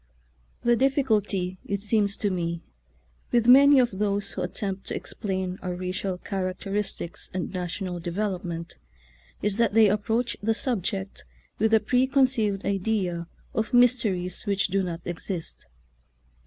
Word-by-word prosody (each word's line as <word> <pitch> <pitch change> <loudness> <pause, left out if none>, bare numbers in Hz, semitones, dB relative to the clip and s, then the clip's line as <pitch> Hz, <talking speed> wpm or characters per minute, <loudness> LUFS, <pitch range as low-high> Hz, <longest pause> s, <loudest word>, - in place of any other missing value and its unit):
The 240 0 +4
difficulty, 215 -9 +1
it 200 0 -3
seems 205 -2 +2
to 205 - 0
me, 170 -2 -2 0.7
with 235 -1 +3
many 280 +2 +8
of 235 -6 +1
those 205 -1 0
who - - -4
attempt 195 -3 -4
to - - -3
explain 190 -3 -3
our 180 -1 -3
racial 185 +1 -3
characteristics 190 -1 -4
and 185 0 -3
national 180 0 -3
devel 185 +2 -2
opment 170 -1 -6 0.7
is 205 0 +1
that 230 -3 +2
they 220 -2 +7
approach 225 +4 0
the 225 +2 +1
subject 195 -5 -2 0.4
with 220 +1 +3
a 220 - +6
preconceived 250 -3 +2
idea 190 -4 -1 0.3
of 220 +2 0
mysteries 225 -7 +2
which 200 -1 +1
do 195 0 +1
not 175 -2 -4
exist. 175 - -5
200 Hz, 135 wpm, -26 LUFS, 185-225 Hz, 0.7 s, many